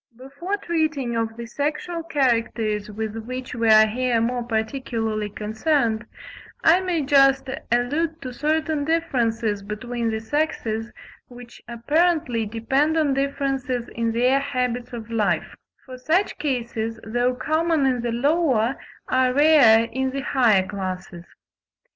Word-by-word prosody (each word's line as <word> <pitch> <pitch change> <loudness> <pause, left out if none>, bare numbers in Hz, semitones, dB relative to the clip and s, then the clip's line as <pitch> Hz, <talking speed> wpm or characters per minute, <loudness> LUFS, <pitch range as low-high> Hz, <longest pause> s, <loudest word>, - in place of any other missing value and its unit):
Before 280 +10 -4
treating 315 -9 -1
of 225 0 -2
the 235 - -6
sexual 300 +7 -3
characters 230 -8 0
with 215 +1 -5
which 255 +3 -6
we 230 -2 +1
are 215 0 +8
here 240 +2 0
more 240 +2 0
particularly 220 -2 -2
concerned, 220 +2 -1 0.6
I 335 +3 +6
may 360 -5 -1
just 275 -1 +4 0.2
allude 295 +7 0
to 255 -1 -6
certain 310 +2 0
differences 235 -10 0
between 230 +3 -4
the 220 0 -2
sexes 225 -3 -2 0.4
which 245 -1 -13
apparently 250 -1 +1
depend 270 +8 0
on 300 -3 +2
differences 270 -3 -2
in 230 0 -2
their 250 +4 +3
habits 250 -3 -2
of 230 -2 -8
life; 215 -3 0 0.3
for 255 -1 -10
such 340 +10 0
cases, 230 -5 -3
though 245 +3 0
common 315 +2 +1
in 255 -2 +1
the 240 0 -2
lower, 265 -2 +1 0.3
are 255 0 +2
rare 285 -7 +6
in 265 +3 -2
the 275 +1 -4
higher 230 -8 +3
classes. 185 -3 -6
250 Hz, 130 wpm, -23 LUFS, 225-285 Hz, 0.6 s, are